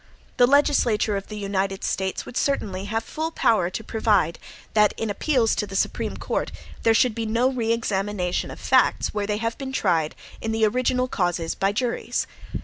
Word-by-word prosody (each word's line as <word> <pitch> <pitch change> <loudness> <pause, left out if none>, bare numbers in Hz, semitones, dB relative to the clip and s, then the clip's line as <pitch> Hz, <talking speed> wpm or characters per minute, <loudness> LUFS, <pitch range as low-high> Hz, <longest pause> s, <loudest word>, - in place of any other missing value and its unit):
The 245 -1 +6
legislature 250 -7 +3
of 195 0 -4
the 215 - -7
United 195 -1 -2
States 190 0 -2
would - - -10
certainly 200 -9 -1
have 225 +2 -2
full 315 +6 -3
power 215 - +2
to 220 - -5
provide, 205 -7 +1 0.3
that 210 -1 +4
in 225 -2 -2
appeals 240 +1 +2
to 210 - -1
the 195 - -8
Supreme - - -1
Court - - -2 0.3
there 225 0 +4
should 245 0 +4
be 225 0 -3
no 235 +4 +2
re 230 -3 -1
examination 200 -5 -1
of - - -9
facts - - +2
where 205 -1 -2
they 210 -1 0
had 230 +1 -2
been 270 -1 -4
tried 170 -11 +1 0.3
in 220 - -2
the 220 0 +3
original 255 +3 +1
causes 175 -7 -1
by 195 +1 +1
juries. 235 +3 -1
215 Hz, 185 wpm, -24 LUFS, 195-235 Hz, 0.3 s, The